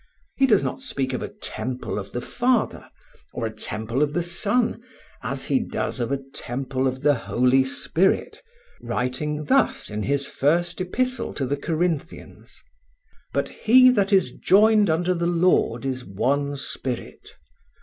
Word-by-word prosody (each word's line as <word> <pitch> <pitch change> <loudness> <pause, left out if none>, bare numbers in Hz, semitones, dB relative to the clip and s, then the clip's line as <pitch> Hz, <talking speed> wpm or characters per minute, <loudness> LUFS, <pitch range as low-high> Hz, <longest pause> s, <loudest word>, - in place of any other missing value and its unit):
He 270 - +3
does 210 -6 +4
not - - -3
speak 135 - -2
of 125 - -2
a - - -3
temple 125 -4 -5
of 95 - -8
the 120 - -3
Father, 250 - 0 0.4
or 115 - -3
a 110 - -4
temple 110 +4 -3
of 150 -1 +1
the 175 - 0
Son, 210 +7 0 0.4
as - - -4
he 265 - +2
does 230 - -3
of 120 +1 -2
a 140 - 0
temple 130 +1 -2
of 130 +1 -4
the 145 0 +5
Holy 125 +1 +2
Spirit, 160 +7 0 0.4
writing 150 +4 -2
thus 270 - +1
in 105 0 -3
his 140 +4 0
first 170 +8 0
epistle 255 +8 -2
to 135 - -1
the 140 +3 0
Corinthians: 160 +1 -4 0.7
"But - - -1
he 255 +3 +6
that 200 -4 +1
is 190 -10 +4
joined 210 - +4
unto 175 +3 +1
the 170 -1 -1
Lord 170 -9 +2
is 130 -1 -2
one 140 +8 -1
spirit." 130 -2 -6
145 Hz, 155 wpm, -24 LUFS, 130-190 Hz, 0.7 s, he